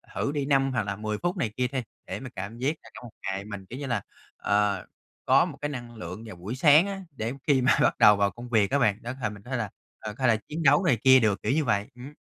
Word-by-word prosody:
thử 140 - -1
đi 145 -2 -2
5 135 -1 +2
hoặc 120 -4 0
là 100 -1 -3
10 105 +1 -3
phút 175 +2 -2
này 115 -10 -1
kia 125 0 +1
đi, 130 0 -3 0.3
để - - -4
mình 130 -1 -8
cảm 100 +5 -6
giác 135 +6 0
là - - -14
trong - - -11
một 120 - -10
ngày 95 +1 -3
mình, 105 -2 -8
kiểu 125 +8 -8
như 145 - -4
là, 115 -5 -1 0.4
ờ, 100 -2 +1 0.4
có - - +5
một - - -8
cái 145 - -2
năng 120 -4 -7
lượng 105 +1 -7
vào 105 - -9
buổi 100 +8 -6
sáng 150 +6 +6
á, 195 -1 -5
để 115 -2 -4
khi 140 -3 +4
mà 130 - +4
bắt - - +3
đầu 105 - +8
vào 100 -1 +2
công 120 +1 -10
việc 110 -3 +2
á 140 - +2
bạn, 105 -5 +2
đó 120 +2 -5
thể 110 - 0
mình 100 -1 -11
thế 130 +1 -4
là, 110 -3 -2 0.3
ờ, 110 -1 -6
hay 130 - +1
là 115 - +5
chiến 160 +2 -3
đấu 145 +4 +5
này 140 -10 +3
kia 130 0 +8
được, 105 -4 +1
kiểu - - +1
như 155 +3 +2
vậy, 105 -3 +1
ừm. 130 +4 -10
120 Hz, 290 wpm, -27 LUFS, 105-135 Hz, 0.4 s, đầu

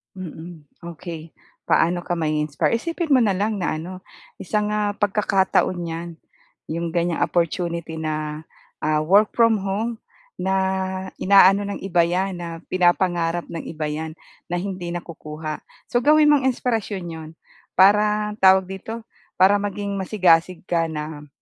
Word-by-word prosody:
Mm, 170 -3 -9 0.3
okey. 165 -1 -9 0.3
Paano 175 +1 +3
ka 175 0 -3
ma-i-inspire? 150 -2 0
Isipin 335 +1 -3
mo 265 - +6
na 205 -5 +2
lang 205 +1 -1
na 175 - -1
ano, 180 +4 -7 0.4
isang, 210 0 -1
ah, 210 -1 0
pagkakataon 195 -3 +1
'yan. 165 +1 -5 0.6
'Yong 170 +1 -2
ganyang 170 -1 0
opportunity 170 -1 -1
na, 155 -1 -3 0.4
ah, 155 0 +1
work 200 +6 +4
from 230 -3 +4
home, 215 +4 -2 0.4
na 190 +1 0 0.6
ina-ano 195 +1 +5
ng 200 - -4
iba 175 -3 +2
'yan, 185 +3 0
na 170 -1 -7
pinapangarap 175 -2 +2
ng 165 - -5
iba 155 -1 -4
'yan, 155 +1 -5 0.3
na 175 - -2
hindi 185 -1 -4
nakukuha. 155 -2 -6 0.3
So, 240 - +3
gawin 300 +3 +5
mong 270 -3 +3
inspirasyon 225 -6 -1
'yon. 160 -1 -8 0.5
Parang 210 +2 +3
tawag 190 0 +6
dito, 220 +4 -7 0.3
para 195 +2 +5
maging 200 0 -3
masigasig 180 -3 +2
ka 170 -2 0
na. 150 -1 -6
180 Hz, 135 wpm, -22 LUFS, 165-205 Hz, 0.6 s, mo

